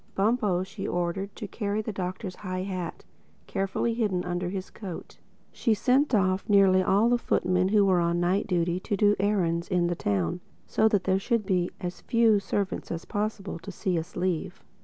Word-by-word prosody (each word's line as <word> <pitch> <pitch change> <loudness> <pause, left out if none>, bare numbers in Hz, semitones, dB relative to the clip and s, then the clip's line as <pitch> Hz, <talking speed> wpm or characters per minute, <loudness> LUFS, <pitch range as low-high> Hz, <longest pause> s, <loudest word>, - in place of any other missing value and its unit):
Bumpo 205 -3 +2
she 195 +1 -6
ordered 175 +3 -2
to 210 - -6
carry 205 0 -2
the 220 - -3
Doctor's 185 0 -4
high 185 -2 -4
hat—carefully 195 +3 -4
hidden 205 -6 0
under 175 0 -2
his 190 0 -5
coat. 190 -6 -8 0.3
She 225 -3 +1
sent 260 +4 +3
off 185 -1 +2
nearly 195 -2 +5
all 200 +4 +3
the 240 0 +3
footmen 185 -4 +1
who 205 0 +4
were 185 -2 +4
on 170 0 +1
night 180 +4 +1
duty 175 -1 0
to 200 +2 -2
do 205 +1 +4
errands 180 -4 +1
in 180 -2 +1
the 175 0 0
town, 100 - -1 0.3
so 220 - +2
that 205 -4 +2
there 190 0 +2
should 230 0 0
be 180 -2 +1
as 180 0 -5
few 230 -3 +3
servants 200 0 -2
as 165 -1 -4
possible 205 -4 -3
to 200 - -8
see 180 -1 -1
us 160 +2 -8
leave. 180 -1 -2
190 Hz, 180 wpm, -27 LUFS, 180-205 Hz, 0.3 s, nearly